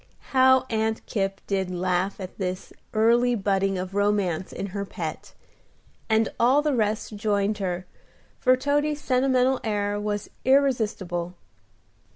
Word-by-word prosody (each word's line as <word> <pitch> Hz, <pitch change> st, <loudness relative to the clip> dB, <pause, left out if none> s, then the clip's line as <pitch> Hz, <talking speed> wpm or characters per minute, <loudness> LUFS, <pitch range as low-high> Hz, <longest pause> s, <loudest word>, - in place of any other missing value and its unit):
How 260 Hz, 0 st, +5 dB
Aunt 220 Hz, 0 st, -1 dB
Kipp 195 Hz, -2 st, -2 dB
did 190 Hz, -2 st, -1 dB
laugh 185 Hz, +2 st, -1 dB
at 185 Hz, +1 st, -8 dB
this 185 Hz, -1 st, -4 dB, 0.2 s
early 235 Hz, +3 st, +3 dB
budding 195 Hz, -2 st, 0 dB
of 185 Hz, +1 st, -5 dB
romance 200 Hz, -4 st, 0 dB
in 195 Hz, -, -4 dB
her 200 Hz, -1 st, -2 dB
pet! 200 Hz, -, -6 dB, 0.7 s
And 220 Hz, 0 st, +3 dB
all 260 Hz, +5 st, +4 dB
the 300 Hz, -2 st, +1 dB
rest 215 Hz, -2 st, -1 dB
joined 205 Hz, 0 st, 0 dB
her, 180 Hz, -2 st, -3 dB, 0.5 s
for 255 Hz, 0 st, +4 dB
Toady's 290 Hz, +2 st, 0 dB
sentimental 260 Hz, -1 st, +2 dB
air 205 Hz, -1 st, -1 dB
was 205 Hz, 0 st, -3 dB
irresistible. 215 Hz, -10 st, +1 dB
210 Hz, 130 wpm, -25 LUFS, 195-250 Hz, 0.7 s, How